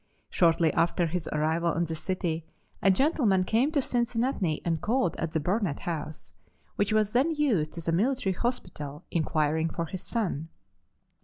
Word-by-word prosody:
Shortly 165 Hz, -2 st, +3 dB
after 170 Hz, +1 st, +2 dB
his 170 Hz, +1 st, -3 dB
arrival 160 Hz, +2 st, +1 dB
in 170 Hz, +1 st, 0 dB
the 165 Hz, -, -4 dB
city 165 Hz, -1 st, -2 dB, 0.4 s
a 195 Hz, -, +4 dB
gentleman 210 Hz, -, +3 dB
came 235 Hz, +10 st, +2 dB
to 285 Hz, -4 st, +2 dB
Cincinnati 235 Hz, -, 0 dB
and 165 Hz, -2 st, 0 dB
called 220 Hz, -6 st, +1 dB
at 165 Hz, -1 st, -3 dB
the 160 Hz, -, +2 dB
Burnett 180 Hz, -1 st, -1 dB
House, 150 Hz, -, -5 dB, 0.4 s
which 205 Hz, +1 st, +1 dB
was 215 Hz, -1 st, +2 dB
then 285 Hz, +7 st, +2 dB
used 210 Hz, -, +1 dB
as 170 Hz, -, -7 dB
a -, -, +3 dB
military 205 Hz, +2 st, +1 dB
hospital, 170 Hz, -, -4 dB
inquiring 160 Hz, 0 st, +1 dB
for 165 Hz, +1 st, -3 dB
his 185 Hz, +2 st, -6 dB
son. 180 Hz, -, -2 dB
175 Hz, 160 wpm, -28 LUFS, 160-225 Hz, 0.4 s, a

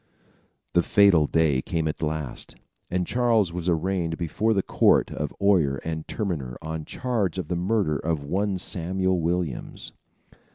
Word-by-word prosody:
The 85 Hz, -, +5 dB
fatal 90 Hz, -5 st, +5 dB
day 75 Hz, -5 st, +2 dB
came 80 Hz, +2 st, -2 dB
at 75 Hz, -, -4 dB
last, 75 Hz, -4 st, -4 dB, 0.3 s
and 90 Hz, 0 st, 0 dB
Charles 115 Hz, -5 st, +2 dB
was 90 Hz, 0 st, -2 dB
arraigned 85 Hz, -1 st, 0 dB
before 95 Hz, +6 st, 0 dB
the 100 Hz, -3 st, +2 dB
court -, -, +3 dB
of -, -, -3 dB
oyer 90 Hz, -9 st, +3 dB
and 80 Hz, -1 st, -4 dB
terminer 75 Hz, -, -3 dB
on 80 Hz, -1 st, -5 dB
charge 110 Hz, -9 st, -1 dB
of 95 Hz, -, -4 dB
the 90 Hz, -, 0 dB
murder 90 Hz, -3 st, +1 dB
of 80 Hz, -1 st, -2 dB
one 95 Hz, +6 st, -1 dB
Samuel 95 Hz, 0 st, -1 dB
Williams. 85 Hz, -4 st, -2 dB
85 Hz, 150 wpm, -25 LUFS, 80-95 Hz, 0.3 s, The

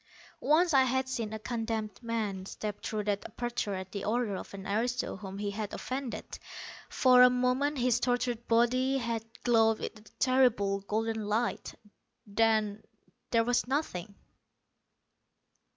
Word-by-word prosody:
Once 335 Hz, +3 st, +3 dB
I 270 Hz, -, +7 dB
had 260 Hz, 0 st, +1 dB
seen 230 Hz, -5 st, -3 dB
a 220 Hz, -, -3 dB
condemned 225 Hz, -1 st, -3 dB
man 215 Hz, -5 st, -3 dB
step 210 Hz, 0 st, -5 dB
through 215 Hz, -1 st, -2 dB
that 205 Hz, -1 st, -1 dB
aperture 240 Hz, -4 st, -3 dB
at 185 Hz, 0 st, -6 dB
the 200 Hz, -1 st, -4 dB
order 220 Hz, -2 st, 0 dB
of -, -, -7 dB
an 195 Hz, -1 st, -8 dB
aristo 240 Hz, +5 st, -1 dB
whom 195 Hz, -1 st, -8 dB
he 205 Hz, 0 st, -2 dB
had 210 Hz, 0 st, -4 dB
offended. 260 Hz, -1 st, -5 dB, 0.5 s
For 250 Hz, -1 st, +5 dB
a 250 Hz, -, +9 dB
moment 255 Hz, +4 st, +1 dB
his 245 Hz, -1 st, +2 dB
tortured 245 Hz, -1 st, -1 dB
body 255 Hz, +3 st, +3 dB
had 230 Hz, -3 st, -2 dB, 0.2 s
glowed 225 Hz, -2 st, +4 dB
with 220 Hz, -, -6 dB
a 215 Hz, 0 st, -19 dB
terrible 235 Hz, -7 st, +3 dB
golden 220 Hz, +2 st, -2 dB
light. 225 Hz, +3 st, -1 dB, 0.5 s
Then 215 Hz, 0 st, +1 dB, 0.5 s
there 230 Hz, -1 st, +3 dB
was 245 Hz, +1 st, +1 dB
nothing. 215 Hz, -, -2 dB
230 Hz, 145 wpm, -30 LUFS, 210-250 Hz, 0.5 s, a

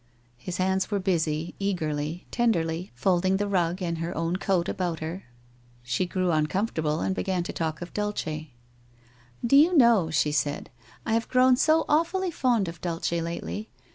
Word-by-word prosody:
His 175 Hz, +7 st, -5 dB
hands 190 Hz, +1 st, +1 dB
were 205 Hz, -, 0 dB
busy, 165 Hz, -4 st, -1 dB
eagerly, 160 Hz, -4 st, -2 dB
tenderly, 175 Hz, -7 st, 0 dB
folding 185 Hz, +6 st, +2 dB
the 205 Hz, +1 st, -1 dB
rug 180 Hz, -1 st, 0 dB
and 170 Hz, -2 st, -2 dB
her 165 Hz, +2 st, -4 dB
own 165 Hz, +2 st, 0 dB
coat 185 Hz, -3 st, 0 dB
about 175 Hz, -4 st, -2 dB
her. 165 Hz, +5 st, -5 dB, 0.6 s
She 120 Hz, +9 st, -1 dB
grew 185 Hz, 0 st, 0 dB
uncomfortable, 155 Hz, -1 st, 0 dB
and 190 Hz, -, 0 dB
began 185 Hz, -2 st, -1 dB
to -, -, -5 dB
talk 160 Hz, 0 st, -3 dB
of 175 Hz, -, -10 dB
Dulce. 210 Hz, 0 st, -2 dB
1 155 Hz, -1 st, -5 dB, 1.0 s
Do 235 Hz, -, +4 dB
you 325 Hz, +5 st, +6 dB
know,' 235 Hz, -, +5 dB
she 150 Hz, -1 st, +1 dB
said, 145 Hz, -1 st, -1 dB, 0.2 s
* -, -, -26 dB
I 220 Hz, -, 0 dB
have 230 Hz, 0 st, 0 dB
grown 255 Hz, 0 st, +5 dB
so 315 Hz, +5 st, +3 dB
awfully 340 Hz, +4 st, +1 dB
fond 240 Hz, -, +1 dB
of 165 Hz, -1 st, -8 dB
Dulce 170 Hz, -2 st, -2 dB
lately. 170 Hz, +5 st, -3 dB
180 Hz, 170 wpm, -26 LUFS, 165-210 Hz, 1.0 s, you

